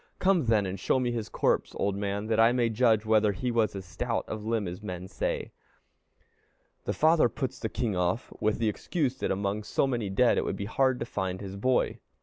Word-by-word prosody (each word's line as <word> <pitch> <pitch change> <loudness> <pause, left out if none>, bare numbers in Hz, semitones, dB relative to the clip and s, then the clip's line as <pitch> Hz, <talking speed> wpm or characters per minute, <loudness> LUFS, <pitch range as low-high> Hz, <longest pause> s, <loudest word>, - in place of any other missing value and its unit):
"Come, 185 -8 +2
then, 110 -3 +3
and 95 0 -4
show 130 - +1
me 125 -1 0
his 115 -3 -3
corpse, - - 0
old 100 -1 0
man, 100 +1 -2
that 110 0 0
I 115 +2 +6
may 120 -2 +2
judge 110 -1 +3
whether 110 -1 +3
he 120 +6 -2
was 110 -3 +1
as 95 -1 -6
stout 115 +6 -2
of 110 -1 -5
limb 110 -2 -1
as 90 +2 -6
men 90 -3 -6
say." 95 - -3 1.3
The - - 0
father 155 -4 +4
puts 130 +3 -4
the 110 - -3
king 115 -5 -2
off 90 +6 -1
with 110 0 +1
the 115 - 0
excuse 135 - -1
that - - -1
among 100 +2 -1
so 105 - 0
many 120 -6 -1
dead 120 +6 +3
it - - 0
would - - -3
be 100 - -4
hard 130 +4 +2
to - - -1
find 95 -5 -3
his 100 -1 -7
boy. 125 +5 +1
110 Hz, 220 wpm, -28 LUFS, 100-120 Hz, 1.3 s, I